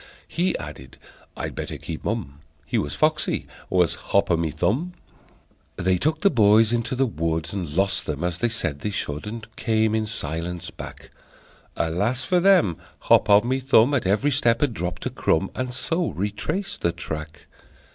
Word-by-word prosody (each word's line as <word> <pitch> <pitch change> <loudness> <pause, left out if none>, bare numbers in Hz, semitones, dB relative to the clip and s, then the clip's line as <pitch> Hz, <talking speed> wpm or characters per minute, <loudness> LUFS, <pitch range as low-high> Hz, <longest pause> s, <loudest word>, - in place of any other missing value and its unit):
He 180 +2 0
added: 65 -4 -9 0.4
"I'd - - -4
better - - -5
keep 80 - -7
mum." 100 -10 -3 0.3
(He - - 0
was 75 - -3
foxy, 155 0 +1 0.2
was 90 -3 +3
Hop 100 -2 +1
O' - - +5
My 80 -1 0
Thumb!) 105 - 0 0.8
They 90 0 +1
took 155 +2 0
the 200 - +4
boys 110 -2 +5
into 120 +2 -1
the 135 +1 +2
wood, 80 -6 -2
And 85 -7 -4
lost 95 +1 +1
them, 75 +1 -3
as 90 0 -2
they 120 - +1
said 80 -10 -2
they 105 - -2
should, 75 -3 -3
And 110 0 -6
came 110 -2 +1
in 110 -1 0
silence 85 -3 -4
back. - - -10 0.6
Alas 100 +11 0
for 180 +5 +2
them! 175 - +4 0.2
Hop - - +4
O' 100 0 +8
My 130 +4 0
Thumb 130 0 +4
At 125 -9 +1
every 110 +10 +2
step 120 -4 +2
had 145 -5 +2
dropped 90 -2 -4
a - - -1
crumb, 95 +4 +1
And 130 -1 -3
so 165 +7 -1
retraced 105 - -3
the 85 - +2
track. 80 -3 -7
105 Hz, 175 wpm, -24 LUFS, 85-125 Hz, 0.8 s, O